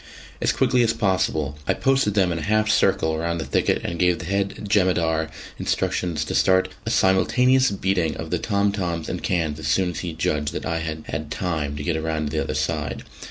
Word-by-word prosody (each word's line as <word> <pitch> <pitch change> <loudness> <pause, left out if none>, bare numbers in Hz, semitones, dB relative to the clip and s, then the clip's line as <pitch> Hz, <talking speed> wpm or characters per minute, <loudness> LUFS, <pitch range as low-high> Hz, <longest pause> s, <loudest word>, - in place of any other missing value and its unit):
As - - +3
quickly 125 -1 +2
as 115 -1 +3
possible 80 - 0
I - - +2
posted 135 -6 +1
them 95 -4 +3
in 85 - -2
a - - -5
half 110 +5 +2
circle 80 0 +2
round 85 +1 -1
the 80 - -3
thicket, 65 - +1
and 85 -1 -3
gave 90 -1 +3
the 90 - -7
head 100 +3 -2
jemadar 85 -5 +2 0.3
instructions 85 -4 -1
to - - -4
start 95 0 +3 0.2
a - - +1
simultaneous 125 +7 +3
beating 95 -4 0
of - - -6
the - - 0
tom 100 0 +1
toms 85 -5 -3
and - - -4
cans 80 -4 -1
as 75 - -4
soon 90 +4 +2
as - - -6
he 85 -3 -4
judged 75 -2 -1
that - - -4
I 80 - -1
had 80 -1 -5
had 75 0 -4
time 80 -4 -2
to 70 - -5
get 80 0 -1
round 80 -2 -2
to 80 - -3
the 75 - +1
other 75 - -4
side. 75 -1 -2
85 Hz, 215 wpm, -23 LUFS, 80-95 Hz, 0.3 s, As